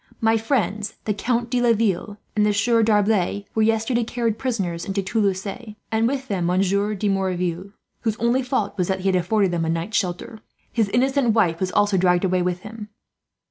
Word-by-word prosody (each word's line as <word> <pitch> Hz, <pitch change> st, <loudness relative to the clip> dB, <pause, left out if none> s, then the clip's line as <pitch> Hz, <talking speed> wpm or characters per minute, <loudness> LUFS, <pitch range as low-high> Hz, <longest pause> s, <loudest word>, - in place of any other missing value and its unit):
My 225 Hz, 0 st, +3 dB
friends, 215 Hz, -3 st, -1 dB
the 210 Hz, -, +1 dB
Count 235 Hz, +3 st, -1 dB
de 250 Hz, -1 st, +1 dB
Laville 215 Hz, -4 st, +1 dB, 0.2 s
and 210 Hz, -, +3 dB
the 210 Hz, -1 st, +2 dB
Sieur 230 Hz, +3 st, +3 dB
D'Arblay, 205 Hz, -2 st, +2 dB
were 220 Hz, -, +1 dB
yesterday 225 Hz, +2 st, +1 dB
carried 230 Hz, -1 st, -2 dB
prisoners 195 Hz, -10 st, -2 dB
into 195 Hz, 0 st, -2 dB
Toulouse; 195 Hz, -1 st, 0 dB
and 220 Hz, +1 st, -3 dB
with 270 Hz, +1 st, -2 dB
them 180 Hz, -4 st, -1 dB
Monsieur 195 Hz, +3 st, +1 dB
de 205 Hz, +1 st, -2 dB
Merouville, 185 Hz, -1 st, -1 dB, 0.3 s
whose 220 Hz, -3 st, -1 dB
only 235 Hz, +3 st, +2 dB
fault 250 Hz, -5 st, -1 dB
was 180 Hz, -, +1 dB
that 190 Hz, -1 st, -1 dB
he 195 Hz, -, +1 dB
had 190 Hz, -, +2 dB
afforded 190 Hz, +2 st, +1 dB
them 170 Hz, -1 st, -1 dB
a 160 Hz, -, -1 dB
night's 165 Hz, +6 st, -1 dB
shelter. 185 Hz, +3 st, -3 dB, 0.3 s
His 220 Hz, -4 st, +1 dB
innocent 260 Hz, 0 st, +2 dB
wife 175 Hz, -7 st, +2 dB
was 185 Hz, -1 st, -1 dB
also 205 Hz, -1 st, +2 dB
dragged 180 Hz, 0 st, +3 dB
away 185 Hz, -1 st, +1 dB
with 180 Hz, 0 st, -1 dB
him. 210 Hz, 0 st, -9 dB
210 Hz, 190 wpm, -22 LUFS, 185-225 Hz, 0.3 s, My